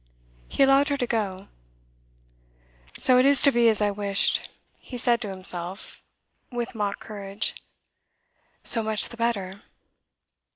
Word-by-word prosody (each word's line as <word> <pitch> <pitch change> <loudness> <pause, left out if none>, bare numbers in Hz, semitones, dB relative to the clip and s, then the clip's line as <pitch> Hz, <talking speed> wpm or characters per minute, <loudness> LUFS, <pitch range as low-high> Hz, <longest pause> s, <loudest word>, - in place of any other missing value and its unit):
He - - +1
allowed 275 +1 +4
her 285 - 0
to 250 - -1
go. 200 -5 -3 1.5
'So 250 -1 +5
it 255 - +4
is 280 0 +5
to 280 - +6
be 235 -2 +4
as 215 -1 +1
I 205 - +1
wished,' 200 -1 0 0.3
he 250 - -9
said 240 -1 +1
to 210 - -4
himself, 185 0 -3 0.5
with 240 0 -4
mock 205 -3 -3
courage. 200 -2 -4 1.1
'So 230 - +4
much 215 -1 0
the 235 - -10
better. 200 -5 -2
220 Hz, 135 wpm, -25 LUFS, 200-245 Hz, 1.5 s, to